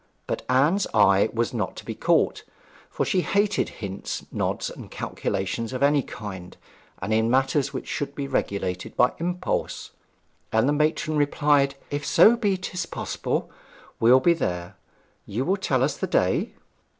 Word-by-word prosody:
But -, -, -3 dB
Anne's 150 Hz, +10 st, +3 dB
eye 100 Hz, 0 st, +5 dB
was 115 Hz, +1 st, -1 dB
not 105 Hz, -6 st, -2 dB
to -, -, -10 dB
be -, -, -4 dB
caught, -, -, +1 dB, 0.5 s
for -, -, -1 dB
she 185 Hz, -, +1 dB
hated 205 Hz, +3 st, +1 dB
hints, 100 Hz, -2 st, -6 dB
nods, -, -, -2 dB
and -, -, -10 dB
calculations 110 Hz, +6 st, -3 dB
of 130 Hz, -, -1 dB
any 145 Hz, 0 st, +4 dB
kind 95 Hz, -8 st, -8 dB, 0.5 s
in 110 Hz, +1 st, +2 dB
matters 135 Hz, +2 st, +2 dB
which 130 Hz, -, -6 dB
should 140 Hz, -2 st, -3 dB
be 140 Hz, -1 st, -3 dB
regulated 95 Hz, -8 st, -2 dB
by 125 Hz, -, +4 dB
impulse; 180 Hz, +2 st, -2 dB, 0.6 s
and 110 Hz, +3 st, +3 dB
the 145 Hz, -, +3 dB
matron 155 Hz, +1 st, +1 dB
replied, 145 Hz, -1 st, +2 dB, 0.2 s
'If 145 Hz, 0 st, -2 dB
so 225 Hz, +9 st, +6 dB
be 205 Hz, -5 st, 0 dB
'tis 180 Hz, -2 st, -4 dB
possible, -, -, -3 dB, 0.5 s
we'll 120 Hz, +3 st, +6 dB
be 170 Hz, +5 st, +4 dB
there. 90 Hz, -, -3 dB, 0.5 s
You 120 Hz, +7 st, -2 dB
will 190 Hz, -, +2 dB
tell 130 Hz, -9 st, +1 dB
us 140 Hz, +1 st, +1 dB
the -, -, -2 dB
day?' -, -, +1 dB
135 Hz, 155 wpm, -25 LUFS, 110-155 Hz, 0.6 s, so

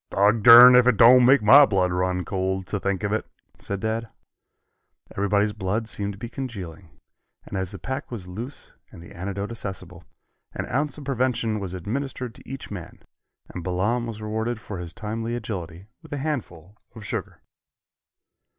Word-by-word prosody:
"Dogdurn 115 Hz, +5 st, +8 dB
if 125 Hz, 0 st, +6 dB
it 125 Hz, -4 st, +3 dB
don't 125 Hz, +1 st, +7 dB
make 135 Hz, -3 st, +5 dB
my 135 Hz, +8 st, +9 dB
blood 95 Hz, -3 st, +1 dB
run 90 Hz, 0 st, -1 dB
cold 95 Hz, +1 st, -2 dB
to 100 Hz, -, -3 dB
think 100 Hz, +1 st, -2 dB
of 100 Hz, 0 st, -1 dB
it," 110 Hz, -, 0 dB, 0.4 s
said 100 Hz, -1 st, -5 dB
Dad. 110 Hz, 0 st, -2 dB, 1.1 s
Everybody's 100 Hz, +1 st, +1 dB
blood 105 Hz, +2 st, -2 dB
seemed 100 Hz, -2 st, -3 dB
to -, -, -13 dB
be 120 Hz, -, -6 dB
congealing, 100 Hz, -9 st, -7 dB, 0.6 s
and -, -, -8 dB
as 95 Hz, -1 st, -2 dB
the 95 Hz, -, -7 dB
pack 130 Hz, -, -5 dB
was 105 Hz, -7 st, -7 dB
loose 115 Hz, +10 st, -8 dB, 0.2 s
and 85 Hz, -, -12 dB
the -, -, -14 dB
antidote 100 Hz, +4 st, -5 dB
accessible, 95 Hz, -6 st, -6 dB, 0.5 s
an -, -, -4 dB
ounce 145 Hz, +4 st, -1 dB
of 150 Hz, -, -9 dB
prevention 125 Hz, -5 st, -1 dB
was 95 Hz, -2 st, -5 dB
administered 125 Hz, +5 st, -4 dB
to -, -, -16 dB
each 135 Hz, -4 st, -8 dB
man, 90 Hz, -5 st, -9 dB, 0.5 s
and 90 Hz, -, -6 dB
Balaam 100 Hz, +7 st, -1 dB
was 110 Hz, -2 st, -7 dB
rewarded 110 Hz, +2 st, -3 dB
for 100 Hz, -4 st, -7 dB
his 85 Hz, -2 st, -6 dB
timely 115 Hz, +4 st, -4 dB
agility 95 Hz, -6 st, -6 dB, 0.2 s
with 160 Hz, -, -16 dB
a 145 Hz, -, -3 dB
handful 110 Hz, -, -5 dB, 0.2 s
of 110 Hz, -2 st, -10 dB
sugar. -, -, -5 dB
105 Hz, 170 wpm, -24 LUFS, 95-120 Hz, 1.1 s, my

